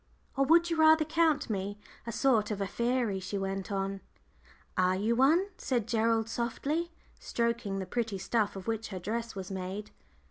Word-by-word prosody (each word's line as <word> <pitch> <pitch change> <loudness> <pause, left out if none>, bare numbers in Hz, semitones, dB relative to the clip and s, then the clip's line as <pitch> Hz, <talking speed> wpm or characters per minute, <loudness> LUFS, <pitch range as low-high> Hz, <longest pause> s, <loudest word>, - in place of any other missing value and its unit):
"Or 275 0 +3
would 335 +3 +5
you 335 - 0
rather 315 0 +6
count 320 -1 +2
me 200 -1 -3 0.3
a - - -2
sort 230 -3 +2
of 210 -2 -3
a 200 - 0
fairy?" 235 -1 0
she 190 +2 -4
went 195 0 -3
on. 195 0 -2 0.7
"Are 185 0 +3
you 215 +5 +1
one?" 300 +9 +4
said 240 -5 -1
Gerald, 225 -1 +2
softly 280 +9 -2 0.3
stroking 235 -4 -1
the 190 - -3
pretty 225 +1 -2
soft 190 - -8
stuff 220 -4 +1
of 195 - -7
which 225 0 -2
her 190 - -6
dress 225 +5 -3
was 190 0 -6
made. 190 +2 -5
225 Hz, 180 wpm, -30 LUFS, 195-255 Hz, 0.7 s, rather